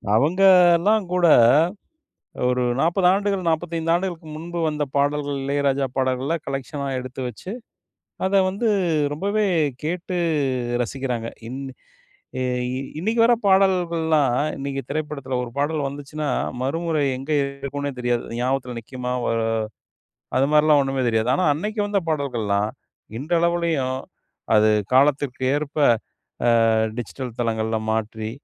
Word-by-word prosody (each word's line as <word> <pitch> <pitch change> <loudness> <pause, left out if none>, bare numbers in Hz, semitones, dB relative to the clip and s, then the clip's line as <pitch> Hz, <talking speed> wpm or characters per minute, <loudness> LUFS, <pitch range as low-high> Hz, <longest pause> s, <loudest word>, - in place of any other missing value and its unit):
அவங்கலாம் 180 - +5
கூட, 180 -1 +3 1.2
ஒரு 125 0 +1 0.2
40 175 +3 +3
ஆண்டுகள் 195 -2 -1
45 165 0 -1
ஆண்டுகளுக்கு 175 -3 -4
முன்பு 170 +2 -5
வந்த 150 -1 -1
பாடல்கள், 145 0 0
இளையராஜா 140 -1 +1
பாடல்களா 130 +4 0
கலெக்ஷனா 140 +1 -4
எடுத்து 130 +1 -7
வச்சு, 125 - -8 0.8
அத 195 +1 +3
வந்து 205 +5 -1 0.5
ரொம்பவே 200 +6 0 0.4
கேட்டு 180 +3 -3 0.7
ரசிக்கிறாங்க. 125 -2 -3 0.2
இன் 130 +3 -6 0.8
எ - - 0 0.3
இ - - -3 0.2
இன்னைக்கு 220 +7 0
வர 240 - +5
பாடல்கள்லாம் 170 -8 +3 0.2
இன்னைக்கு 135 0 -4
திரைப்படத்தில 150 -4 -4
1 120 - -9
பாடல் 145 0 0
வந்துச்சுன்னா, 145 +2 -5 0.3
மறுமுறை 160 +2 -1
எங்க 135 +4 -8
இருக்கும்ன்னே 140 +1 -4
தெரியாது. 120 -1 0
அது 115 - -6
ஞாபகத்தில 125 -1 -1
நிக்குமா? 125 +2 -5
வ - - 0 1.1
அதுமாதிரிலாம் 150 +2 +4
ஒண்ணுமே 135 -1 -1
தெரியாது. 115 +1 +1
ஆனா 185 - 0
அன்னைக்கு 210 +9 -4
வந்த 205 -1 +1
பாடல்கள்லாம், 115 -9 0 0.5
இன்றளவுலயும் 165 -4 0 0.6
அது 110 0 +5 0.2
காலத்துக்கு 135 -1 +2
ஏற்ப, 145 0 -4 1.0
அ - - +3 0.3
டிஜிட்டல் 120 +1 -6
தளங்கள்ள 110 -1 0
மாற்றி, 110 0 -2
145 Hz, 115 wpm, -22 LUFS, 130-170 Hz, 1.2 s, அவங்கலாம்